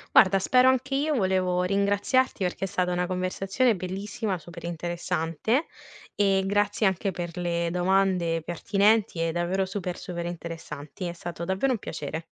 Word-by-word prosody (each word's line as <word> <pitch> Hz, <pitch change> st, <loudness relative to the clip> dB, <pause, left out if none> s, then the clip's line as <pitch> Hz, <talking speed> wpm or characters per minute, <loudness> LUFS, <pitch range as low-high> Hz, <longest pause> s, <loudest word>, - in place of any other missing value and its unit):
Guarda 195 Hz, +1 st, +7 dB
spero 255 Hz, +6 st, +5 dB
anche 260 Hz, +1 st, 0 dB
io 295 Hz, +2 st, +1 dB
volevo 185 Hz, -4 st, +1 dB
ringraziarti 200 Hz, +5 st, +1 dB
perché 180 Hz, +1 st, -1 dB
è -, -, -3 dB
stata 180 Hz, -1 st, 0 dB
una 180 Hz, 0 st, 0 dB
conversazione 195 Hz, +6 st, +1 dB
bellissima, 195 Hz, +2 st, -3 dB
super 170 Hz, +1 st, -11 dB
interessante, 175 Hz, -, -1 dB, 0.5 s
e 195 Hz, -2 st, +2 dB
grazie 205 Hz, +2 st, +1 dB
anche 190 Hz, +1 st, +1 dB
per 175 Hz, -2 st, -5 dB
le 170 Hz, -1 st, 0 dB
domande 180 Hz, -2 st, +2 dB
pertinenti 200 Hz, +1 st, +2 dB
e 165 Hz, 0 st, +1 dB
davvero 175 Hz, +3 st, 0 dB
super, 185 Hz, -2 st, -4 dB
super 175 Hz, -2 st, -5 dB
interessanti. 165 Hz, -1 st, -7 dB
È 170 Hz, -, -3 dB
stato 170 Hz, -1 st, -6 dB
davvero 190 Hz, +9 st, +1 dB
un 230 Hz, -, 0 dB
piacere. 160 Hz, 0 st, -5 dB
185 Hz, 150 wpm, -26 LUFS, 175-200 Hz, 0.5 s, Guarda